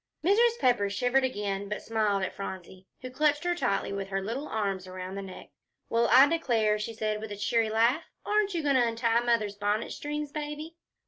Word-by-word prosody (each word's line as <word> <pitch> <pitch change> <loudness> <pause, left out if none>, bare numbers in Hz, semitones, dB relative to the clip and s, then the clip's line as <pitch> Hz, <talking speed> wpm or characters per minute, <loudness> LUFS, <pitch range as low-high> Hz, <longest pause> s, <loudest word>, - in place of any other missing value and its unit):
Mrs. 455 +6 +4
Pepper 240 -6 +2
shivered 245 +7 +1
again, 200 -5 -2
but 210 - -4
smiled 215 -3 0
at 185 - -3
Phronsie, 190 -1 -8 0.2
who 255 - -6
clutched 295 +3 +1
her 350 0 +1
tightly 240 - -1
with 195 -1 -4
her 195 0 -2
little 235 +9 -4
arms 195 -3 -2
around 185 0 -7
the 200 - -4
neck. 190 -1 -10 0.4
"Well, 235 0 +2
I 260 +3 +9
declare!" 235 -9 +1
she 225 +2 -5
said 215 -1 -2
with 220 -1 -7
a - - -4
cheery 225 +2 +1
laugh, 230 +8 +2 0.2
"aren't 415 -2 +1
you 330 - -1
going 280 -2 +3
to 240 -2 +3
untie 230 0 +1
Mother's 235 -4 +1
bonnet 205 +2 -1
strings, 295 0 -4
Baby?" 300 +2 -6
230 Hz, 200 wpm, -28 LUFS, 205-285 Hz, 0.4 s, I